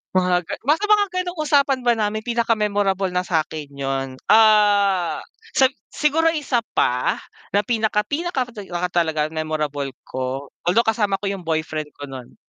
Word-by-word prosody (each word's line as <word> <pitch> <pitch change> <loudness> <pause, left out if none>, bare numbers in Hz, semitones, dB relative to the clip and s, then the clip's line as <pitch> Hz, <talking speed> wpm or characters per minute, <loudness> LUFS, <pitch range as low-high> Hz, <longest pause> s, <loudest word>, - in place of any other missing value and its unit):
Mga 180 -1 +3
ga 165 - -7
nasa 320 +9 +2
mga 415 -1 +5 0.2
ganong 355 -1 -6
usapan 280 -2 +3
ba 240 - +5
namin 215 0 -2
pinaka-memorable 205 -5 +1
na 180 - +2
sa'kin 155 -4 -2
yun, 135 -1 -3 0.2
ah, 205 -6 +4 0.3
sa 265 -1 +5 0.2
siguro 325 +2 +2
isa 255 -7 -1
pa 125 0 +1 0.3
na 205 - +4
pinaka 220 -1 +1
pinaka 285 -3 -2
ka 180 -5 -4
talaga 160 -3 0
memorable 155 -3 -3
ko, 130 +2 -5 0.2
although 195 +7 +4
kasama 210 -3 +1
ko 200 - -1
yung 190 -4 -5
boyfriend 155 -2 -2
ko 145 -1 -9
nun. 130 -2 -9
195 Hz, 150 wpm, -22 LUFS, 155-235 Hz, 0.3 s, mga